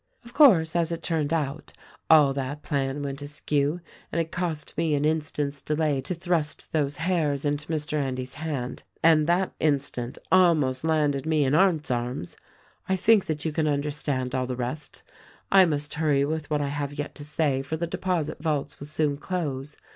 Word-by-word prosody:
"Of 235 - -12
course, 180 - +6
as 170 -1 +1
it 165 -1 -4
turned 160 -3 -1
out, 155 -2 -2 0.4
all 150 -4 +7
that 140 +2 -4
plan 140 0 -1
went 140 0 -4
askew; 145 +2 -1 0.3
and 170 - -1
it 165 -1 -2
cost 165 -4 -3
me 160 -1 +1
an 145 +1 0
instant's 150 -2 -1
delay 150 -2 0
to 160 +7 -3
thrust 170 -3 -2
those 145 -2 0
hairs 160 -5 0
into 145 +1 -1
Mr. 150 -1 -1
Endy's 130 -1 -3
hand, 145 -5 -4 0.2
and 160 -2 +5
that 180 +2 +1
instant 135 -5 -1
almost 155 -8 +4
landed 150 -3 +1
me 155 -3 +2
in 130 - +1
Arndt's 160 -4 +3
arms. 120 -4 -3 0.5
"I 190 - +3
think 210 +2 +4
that 155 -1 -2
you 160 - 0
can 155 0 0
understand 145 -3 -1
all 130 -1 0
the 125 - -3
rest. 125 +5 -5 0.5
I 195 -1 +8
must 145 -3 -1
hurry 150 -3 +2
with 155 0 -3
what 150 -1 +1
I 140 - -1
have 145 0 -3
yet 145 0 -4
to 145 - -8
say 145 -2 0
for 140 +4 -4
the 170 - -1
deposit 170 -3 -2
vaults 150 -3 -2
will 145 - -7
soon 150 -1 0
close. 150 -5 -4
150 Hz, 185 wpm, -26 LUFS, 140-160 Hz, 0.5 s, I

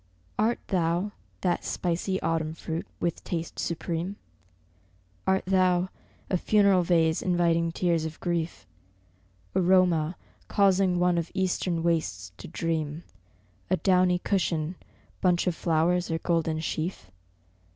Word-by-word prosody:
Art 225 +3 +3
thou, 175 +2 +1 0.3
that 175 -2 0
spicy 180 +2 -1
Autumn 160 -1 0
fruit 165 0 -4
with 170 -1 -2
taste 165 -1 -4
supreme? 170 +3 -2 1.1
Art 190 0 +2
thou 185 -1 +3 0.4
a 185 - +1
funeral 200 -1 +4
vase 165 -2 +2
inviting 170 -2 +2
tears 170 -2 +1
of 160 0 -5
grief? 170 -2 -2 0.9
Aroma 180 -3 +3 0.3
causing 190 -2 +3
one 175 -1 +3
of 165 - -4
Eastern 180 -3 0
wastes 155 - -1
to 85 - -9
dream; 160 -1 -2 0.7
A 185 - +3
downy 180 0 +3
cushion, 175 -4 0 0.5
bunch 180 -2 +3
of 180 - +1
flowers 170 +2 +1
or 165 - 0
golden 165 -2 0
sheaf? 155 - -4
175 Hz, 120 wpm, -27 LUFS, 165-185 Hz, 1.1 s, funeral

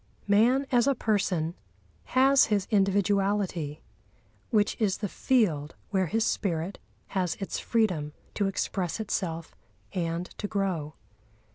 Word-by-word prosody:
Man 235 +7 +4
as 245 0 +4
a 275 - +3
person 185 -8 0 0.5
has 270 +1 +5
his 205 -3 +1
individuality, 195 -5 +1 0.7
which 210 -4 +2
is 200 -3 +2
the 210 - -2
field 175 - +1 0.2
where 190 -3 +2
his 220 +7 +1
spirit 175 -1 -1 0.3
has 185 -3 0
its 195 - -4
freedom 180 -10 0 0.2
to 200 - 0
express 190 -1 -2
itself 170 -6 -3 0.4
and 170 -1 -1
to 205 - -2
grow. 185 -8 -2
195 Hz, 120 wpm, -28 LUFS, 170-215 Hz, 0.7 s, has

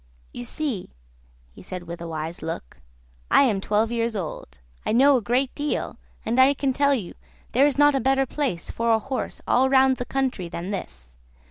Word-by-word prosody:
You 120 - -6
see," 265 - -3 0.6
he - - -14
said, 180 -1 -7
with 170 0 -8
a 170 - -5
wise 160 +1 -5
look, 160 - -6 0.5
"I - - +6
am 215 -8 +1
twelve 215 +3 +1
years 230 -1 -1
old; 155 - -6 0.3
I - - -1
know 275 +4 +6
a 250 - +2
great 250 +4 0
deal, 295 0 -3 0.3
and 235 +3 0
I 270 +2 +6
can 270 -1 0
tell 280 +1 +3
you 200 -9 -5 0.4
there 270 +4 +5
is 285 - -1
not 290 0 +6
a 270 - +1
better 270 +1 +2
place 260 - -3
for 230 0 -1
a 225 - +5
horse 265 +4 -4
all 265 +2 +3
round 265 -1 +4
the 245 - -4
country 260 -11 -2
than 175 +4 -5
this. 65 - -7
235 Hz, 200 wpm, -24 LUFS, 175-270 Hz, 0.6 s, I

